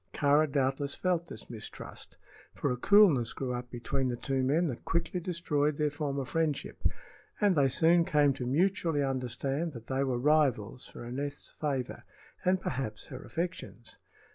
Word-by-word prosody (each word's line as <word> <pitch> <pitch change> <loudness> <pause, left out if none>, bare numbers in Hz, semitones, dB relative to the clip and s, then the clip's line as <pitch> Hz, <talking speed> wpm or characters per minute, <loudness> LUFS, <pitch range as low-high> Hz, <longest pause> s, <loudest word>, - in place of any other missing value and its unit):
Kāra 145 +1 +3
doubtless 140 0 0
felt 175 -2 0
this 110 - -9
mistrust, 110 -2 -9 0.4
for - - 0
a - - 0
coolness 160 - +5
grew 130 -2 -3
up 125 0 -5
between 130 +2 -2
the 125 - -1
two 135 +2 -1
men 145 +7 +2
that 130 -8 -4
quickly 170 +2 -1
destroyed 155 -4 0
their 150 -1 +1
former 140 -2 -2
friendship, 155 +1 -2 0.6
and 205 -3 +4
they 140 -3 +4
soon 165 +5 +4
came 150 -3 +3
to 125 -2 -4
mutually 165 0 +2
understand 135 +4 -2
that 115 -3 -9
they 130 +2 0
were 130 -3 0
rivals 130 -4 +2
for - - -10
Aneth's 140 +4 -5
favor, 135 -5 -3 0.4
and 185 +1 +3
perhaps 125 - -3
her 130 - -7
affections. 165 -9 -5
140 Hz, 160 wpm, -30 LUFS, 130-160 Hz, 0.6 s, coolness